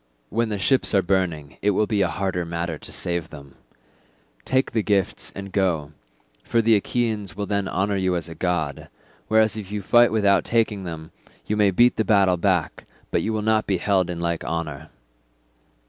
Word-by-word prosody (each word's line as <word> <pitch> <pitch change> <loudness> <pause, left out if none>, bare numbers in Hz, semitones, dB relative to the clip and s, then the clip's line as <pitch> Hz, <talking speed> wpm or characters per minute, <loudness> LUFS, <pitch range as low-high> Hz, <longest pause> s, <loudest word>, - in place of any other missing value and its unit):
When 115 0 0
the 105 - -2
ships 120 +3 +2
are 95 - +4
burning 85 -6 -1
it 105 - +2
will 110 - +3
be 105 -1 0
a 95 - +3
harder 90 +1 -2
matter 85 -1 -4
to - - -10
save 85 -2 -2
them. 70 -2 -12 0.9
Take 130 +1 +1
the 115 - +1
gifts, 100 -3 0
and 100 0 -7
go, 85 -7 0 0.5
for 115 - 0
the 115 0 +4
Achaeans 105 -4 -1
will 100 +1 -3
then 100 -1 -1
honour 100 +2 -1
you 95 -1 0
as 85 -2 -3
a 85 - -8
god; 80 -4 -2 0.4
whereas 110 -1 +3
if 105 -3 -7
you 105 -1 -4
fight 120 +4 +5
without 100 -3 +3
taking 110 -4 0
them, 80 -2 -7 0.3
you 105 - -1
may 105 -1 +4
beat 120 +6 +3
the 110 - +2
battle 100 -4 +3
back, 90 -4 0 0.3
but - - +1
you 110 - -2
will 110 -1 -2
not 110 0 +1
be 95 - +1
held 95 0 +1
in 85 -1 -4
like 85 -1 -2
honour." 80 -2 -4
95 Hz, 195 wpm, -23 LUFS, 85-105 Hz, 0.9 s, fight